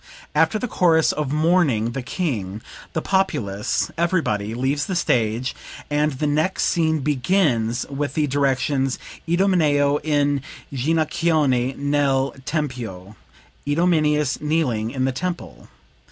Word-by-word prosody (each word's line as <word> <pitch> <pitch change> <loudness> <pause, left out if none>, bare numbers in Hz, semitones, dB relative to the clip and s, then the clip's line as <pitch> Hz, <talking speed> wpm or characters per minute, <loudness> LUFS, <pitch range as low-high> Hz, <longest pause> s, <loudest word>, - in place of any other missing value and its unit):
"After 160 +6 +3
the 250 - -3
chorus 165 -6 +3
of 150 -3 -3
mourning 155 -8 +2
the 135 - -4
King, 115 - -3 0.3
the 160 - -2
populace, 115 - 0
everybody, 115 - 0
leave 135 +4 -1
the 190 - -2
stage, 120 -5 0 0.4
and 150 0 +1
the 135 +3 -2
next 155 +5 +1
scene 160 -2 +1
begins 130 - +1
with 140 -1 -3
the 155 - +2
directions: 135 -1 0 0.3
'Idomeneo 160 -6 +3
in 145 -2 +1 0.3
ginochione 150 -2 +1
nel 140 -1 +1
tempio 120 - -4 0.5
(Idomeneus, 150 -2 +2
kneeling 145 -8 0
in 130 +1 -1
the 135 - +1
temple).' 165 - -5
145 Hz, 115 wpm, -22 LUFS, 125-160 Hz, 0.5 s, After